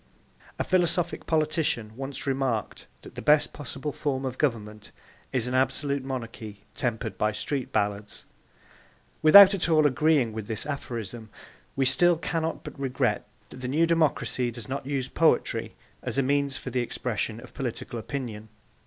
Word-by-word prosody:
A - - 0
philosophic 175 -1 0
politician 155 -8 0
once 135 +2 -5
remarked 130 -6 -2 0.2
that - - -12
the - - -7
best 150 0 +4
possible 145 0 -5
form 135 -2 -2
of 130 -1 -4
government 105 -6 -2 0.4
is 125 -2 0
an 125 - -3
absolute 135 +2 +1
monarchy 115 -5 -6
tempered 120 -5 -2
by 105 0 +2
street 130 +5 -3
ballads. 105 0 -2 1.0
Without 195 +5 +10
at 180 -3 0
all 155 -2 +4
agreeing 145 -4 +3
with 110 -2 -5
this 110 -2 -3
aphorism 115 -5 -5 0.5
we 135 - +2
still 170 +7 +4
cannot 165 -1 -2
but - - -9
regret 135 -2 0 0.2
that - - -11
the 125 0 -5
new 155 +6 +3
democracy 155 -6 +1
does 120 -2 -8
not 135 0 -4
use 135 -3 -1
poetry - - +1 0.3
as - - -4
a 135 - +3
means 140 0 +1
for 125 - -7
the 125 0 0
expression 115 -2 -3
of 125 - -13
political 120 -2 -4
opinion. 110 -3 -6
130 Hz, 155 wpm, -27 LUFS, 115-145 Hz, 1.0 s, Without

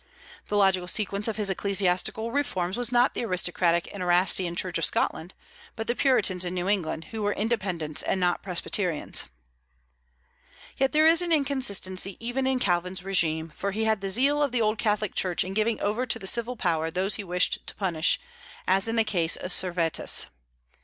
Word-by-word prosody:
The 205 - -1
logical 190 -3 +3
sequence 200 +2 -1
of 225 - -2
his 205 -2 +1
ecclesiastical 200 +3 0
reforms 190 -10 -1
was 245 -1 0
not 245 +1 +3
the - - -3
aristocratic 175 -3 +1
and 200 - -7
Erastian 180 0 +1
Church 180 -1 -1
of - - +1
Scotland, 175 +4 0 0.4
but 225 - -4
the 240 - 0
Puritans 200 -10 +2
in 180 0 -2
New 180 0 -2
England, 175 -5 -1
who 220 -1 -5
were 205 0 0
Independents 190 -9 -2
and 190 - -1
not 180 -1 +1
Presbyterians. 180 -2 -1 1.5
Yet 270 0 +1
there 310 +1 +4
is 330 +1 +5
an 350 -1 -2
inconsistency 205 - 0
even 245 +3 -2
in 265 -1 +1
Calvin's 180 -4 0
régime; 165 -4 0
for 200 - -3
he 220 +2 -1
had 220 -2 +1
the 195 - -3
zeal 275 +8 +2
of 285 -3 +1
the 245 - 0
old 215 0 +1
Catholic 210 -2 0
Church 180 -2 +1
in 185 - -6
giving 220 +2 0
over 215 +5 -1
to 235 - 0
the 205 - -10
civil 235 +5 -1
power 165 -6 0
those 185 +4 0
he 210 - -5
wished 180 -1 0
to - - -5
punish, 175 -5 +1 0.5
as 190 +3 +2
in 225 - -2
the 225 - +4
case 175 -6 +1
of 180 - -4
Servetus. 175 -3 +2
195 Hz, 185 wpm, -26 LUFS, 180-225 Hz, 1.5 s, is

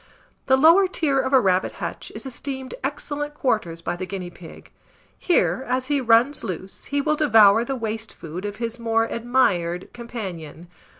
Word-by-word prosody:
The 265 - +5
lower 335 +7 +6
tier 295 -7 0
of 260 - -1
a 265 - +6
rabbit 190 -4 +1
hutch - - -6
is - - -7
esteemed 265 0 -6
excellent 290 +1 -4
quarters 175 - -1
by - - -2
the 185 +1 -6
guinea 185 -2 -6
pig: 170 -2 -13 0.4
here, 345 -6 +1
as 255 +1 -1
he 280 - +1
runs 240 +4 +4
loose, 190 +1 -6
he 285 0 -1
will 305 +2 +1
devour 225 -7 +5
the 270 +3 -3
waste 225 -2 -5
food 165 +3 -8
of 205 0 -4
his 230 +1 -4
more 225 -1 +1
admired 210 -8 0
companion. 185 -9 -7
235 Hz, 170 wpm, -23 LUFS, 190-270 Hz, 0.4 s, lower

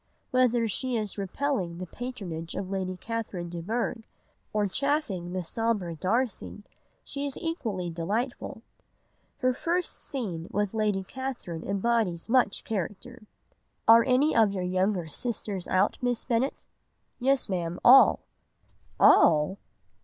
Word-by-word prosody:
Whether 245 -2 +3
she 250 +4 0
is 210 -2 -1
repelling 195 -3 -2
the 185 - -5
patronage 180 -8 -6
of 195 -1 -4
Lady 185 -1 -2
Catherine 210 -6 -4
de 170 0 -5
Bourgh, 230 +5 -2 0.5
or 210 -1 +1
chaffing 210 - -1
the 185 -1 -2
sombre 205 -3 -1
Darcy, 210 - -1 0.4
she 285 0 -3
is 275 - -4
equally 225 - -3
delightful. 220 +8 -3 0.8
Her 255 -1 +3
first 345 +6 -2
scene 185 - -4
with 205 0 -1
Lady 210 -3 0
Catherine 240 -8 -6
embodies 200 -3 0
much 240 -4 +3
character— 215 +4 -5 0.6
"'Are 230 +1 +8
any 265 +6 +3
of 220 -3 +5
your 190 -2 -3
younger 185 -1 0
sisters 200 - -4
out, 190 +2 +2
Miss 245 -2 -1
Bennet?' 250 +3 -1 0.5
"'Yes, 270 +1 +2
Ma'am, 175 -3 -2
all.' 260 +2 +8 0.8
"'All! 155 +4 +5
215 Hz, 125 wpm, -28 LUFS, 185-250 Hz, 0.8 s, Are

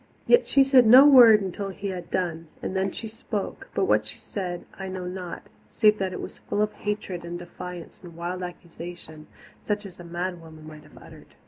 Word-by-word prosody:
Yet 480 +1 +5
she 275 - +5
said 265 -3 +5
no 255 +5 +9
word 235 -7 +8
until 195 +1 -4
he 195 +1 -5
had 180 -2 -6
done, 165 -3 -2
and 185 - -5
then 190 0 0
she 225 - -6
spoke, 215 -2 -5
but 195 - +2
what 110 -6 +2
she - - -8
said 180 -3 -5
I 190 - -7
know 185 -1 -5
not, 180 -1 -6 0.3
save 215 -1 +3
that 190 -1 -1
it 180 - -6
was - - -8
full 210 - -1
of 210 0 -2
hatred 205 -4 -4
and 170 0 -5
defiance 175 0 -9
and 175 -2 -12
wild 175 +2 -4
accusation, 175 -3 -9 0.3
such 210 0 -2
as 185 -2 -11
a - - -9
mad 175 +1 -4
woman 160 -1 -13
might 155 -1 -11
have 150 0 -18
uttered. - - -15
185 Hz, 210 wpm, -25 LUFS, 175-210 Hz, 0.3 s, no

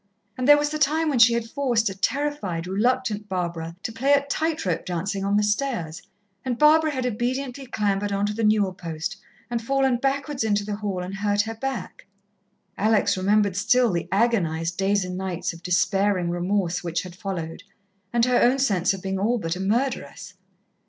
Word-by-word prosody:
And 255 0 -2
there 290 0 +9
was 295 0 0
the 305 - -3
time 310 +2 +2
when 270 -5 +1
she 235 0 +7
had 235 -1 -2
forced 240 -3 0
a 195 - -1
terrified, 200 - -2
reluctant 210 +1 0
Barbara 170 -3 -3
to 225 - -3
play 265 +6 +2
at 280 0 +2
tight 320 -3 -1
rope 175 -3 -1
dancing 195 +3 -3
on 200 +1 +2
the 210 - +2
stairs, 210 - -1 0.4
and 250 -2 -2
Barbara 310 +2 +5
had 260 -4 -2
obediently 250 +3 -2
clambered 205 -3 -1
on 200 0 0
to 210 - -1
the 225 +2 -3
newel 210 -3 +3
post, 165 -3 -5 0.3
and 235 -1 -2
fallen 265 +1 +1
backwards 275 +1 -1
into 205 -2 +1
the 205 -1 -3
hall 200 -4 -3
and 185 +2 -6
hurt 205 0 +1
her 225 +2 -4
back. 265 0 -5 0.7
Alex 205 -1 +3
remembered 200 +1 +2
still 235 +4 +3
the 170 -1 -2
agonized 175 -7 +1
days 195 0 +1
and 180 0 -5
nights 185 -3 -3
of 165 - -12
despairing 185 0 +1
remorse 180 0 -1
which 170 -1 -2
had 180 -1 -10
followed, 175 -4 -5 0.5
and 235 -1 +3
her 250 -1 +3
own 250 +3 +4
sense 195 -8 +1
of 190 - -11
being 190 0 -2
all 230 +5 +1
but 165 -5 -3
a - - -7
murderess. 235 +7 -2
210 Hz, 190 wpm, -24 LUFS, 185-250 Hz, 0.7 s, there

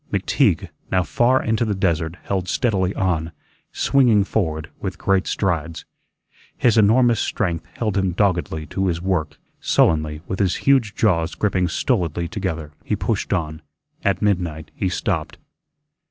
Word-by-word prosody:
McTeague, - - +1 0.2
now 95 -1 +3
far 120 - +2
into 110 +1 +1
the 105 -3 -1
desert, 85 -3 0
held 95 -2 -2
steadily 95 -4 +1
on, 85 -3 0 0.4
swinging 120 -7 +3
forward 80 -7 -2
with - - -4
great 95 -1 +1
strides. 85 -4 -2 0.7
His 120 - +3
enormous 115 +2 +4
strength 85 -5 -2
held 105 -4 -2
him 95 -2 +1
doggedly 85 -5 0
to 95 +4 -2
his 85 -2 0
work. 85 -5 -1 0.2
Sullenly, 75 -1 +2
with 95 - -4
his 95 -3 +2
huge 130 -6 +3
jaws 85 -7 +1
gripping 95 -3 +1
stolidly 85 -1 -1
together, 85 -6 -4
he 105 - -1
pushed 100 +2 -2
on. 80 -4 -2 0.4
At 100 0 +1
midnight 90 -6 -1
he 95 - -1
stopped. - - -2
95 Hz, 140 wpm, -21 LUFS, 80-105 Hz, 0.7 s, enormous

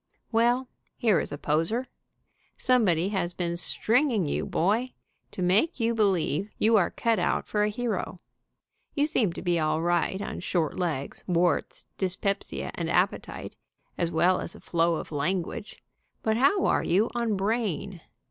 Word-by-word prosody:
Well, 240 +3 +2 0.3
here 215 -6 +3
is - - -4
a 145 - -4
poser. 165 - 0 0.7
Somebody 195 -9 +3
has 180 -4 -2
been 170 -1 -2
"stringing" 225 - +2
you, 145 - -2
boy, 220 +9 0 0.4
to 185 - -4
make 200 - +2
you 230 0 +1
believe 195 -4 +1
you 225 +1 +4
are 195 -5 +4
cut 230 -1 0
out - - 0
for 210 - 0
a 210 - +2
hero. 210 -5 -3 0.8
You 290 -1 +3
seem 255 - +1
to - - -7
be 175 -2 +1
all 155 0 +1
right 175 +2 +1
on - - -5
short 170 -2 -1
legs, 155 -7 -3
warts, 175 -1 0
dyspepsia 195 +1 -2
and - - -3
appetite, - - -1 0.4
as 170 - 0
well 175 +2 +3
as - - -5
a - - -12
flow 170 0 +1
of - - -6
language, 170 +7 -3 0.4
but 220 0 +2
how 370 - +3
are - - +2
you 200 +6 +2
on 235 -4 0
brain? 195 -4 -2
195 Hz, 155 wpm, -27 LUFS, 170-225 Hz, 0.8 s, you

